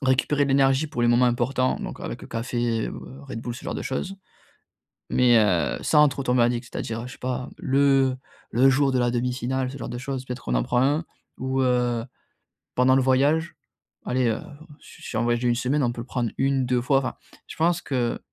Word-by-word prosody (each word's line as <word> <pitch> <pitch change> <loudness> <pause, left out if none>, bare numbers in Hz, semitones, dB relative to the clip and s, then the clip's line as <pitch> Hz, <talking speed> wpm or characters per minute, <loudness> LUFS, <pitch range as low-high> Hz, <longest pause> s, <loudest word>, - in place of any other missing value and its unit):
récupérer 135 +2 +2
de 140 - -2
l'énergie 135 +2 +3
pour 145 -5 -3
les 120 - +4
moments 120 +1 +4
importants. 130 +2 +1
Donc - - -6
avec - - -6
le - - -10
café, 115 -1 -1
heu, - - -6 0.3
Red 115 - -7
Bull, 120 -1 -4
ce - - -11
genre - - -3
de - - -4
choses 190 +9 -4 1.0
mais, 120 -2 +5
heu, 90 - +2
sans 150 0 +5
trop 140 0 -5
tomber 125 -2 +3
addict. 120 0 0
C'est-à-dire, 115 +1 -4
je 125 - -9
sais - - -14
pas, 125 0 -3
le 135 -1 +3 0.4
le 130 +4 +5
jour 135 0 +3
de 130 - +1
la 120 - +2
demi-finale, 125 +1 -1
ce 140 - -8
genre 135 - -6
de 120 - -5
choses, 130 0 -4
peut-être 125 - -7
on 60 - +1
en - - +2
prend 120 - +1
un. 145 +5 +1 0.3
Ou, 130 +1 -1
heu, 125 -2 +1 0.7
pendant 130 +1 +4
le 135 - +4
voyage, 145 +6 +2 0.5
allez, 125 0 +1
heu, 110 - -2 0.4
su - - -16
sur 110 - -3
un - - +1
voyage 120 0 +1
d'une 120 -1 +2
semaine, 130 +4 0
on 120 - +1
peut 120 - -6
le 115 - -8
prendre 120 -4 -2
1-2 130 -2 +1
fois. 135 +2 +3
Enfin, 130 - -4 0.3
je - - -9
pense 170 +2 +2
que 125 -4 -1
125 Hz, 215 wpm, -24 LUFS, 120-135 Hz, 1.0 s, mais